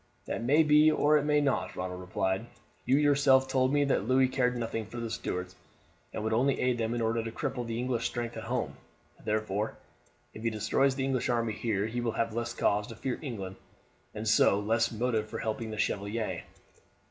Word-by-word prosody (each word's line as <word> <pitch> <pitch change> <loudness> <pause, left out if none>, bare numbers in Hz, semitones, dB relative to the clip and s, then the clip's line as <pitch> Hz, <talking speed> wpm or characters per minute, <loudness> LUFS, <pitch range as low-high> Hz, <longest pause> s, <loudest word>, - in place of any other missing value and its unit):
"That - - -3
may 145 +6 +5
be 150 0 +6
or 155 0 +3
it 145 - -3
may 150 0 +3
not," 140 -2 0
Ronald 90 0 -4
replied. 95 +3 -2 0.4
"You 130 +2 +4
yourself 140 -2 +4
told 130 0 +2
me 145 0 +3
that 130 -6 0
Louis 130 +1 +4
cared 125 -1 0
nothing 115 -2 -3
for 120 - -9
the 115 -1 -4
Stuarts, 90 -5 -4 0.6
and 105 - -4
would 110 0 0
only 130 +4 +2
aid 125 -1 +1
them 115 +1 -1
in 120 - -1
order 115 0 0
to 115 - -4
cripple 125 -1 -3
the 115 0 -3
English 120 -1 -1
strength 120 -1 -4
at - - -6
home. - - -2 0.5
Therefore, 105 0 -1 0.6
if 110 - -9
he 115 - +1
destroys 115 +5 +1
the 135 -1 -1
English 130 -2 0
army 115 -2 +1
here 105 -2 -1
he 120 +2 -3
will 115 -2 -1
have 115 -1 -1
less 120 +1 -2
cause 105 0 +1
to 115 - -9
fear 125 +3 -3
England 100 -9 -6 0.6
and 110 +1 -4
so 105 -2 +4
less 115 +2 +1
motive 110 -1 -1
for - - -5
helping 110 0 -3
the 110 - -5
Chevalier." 100 -3 -2
115 Hz, 205 wpm, -30 LUFS, 110-130 Hz, 0.6 s, be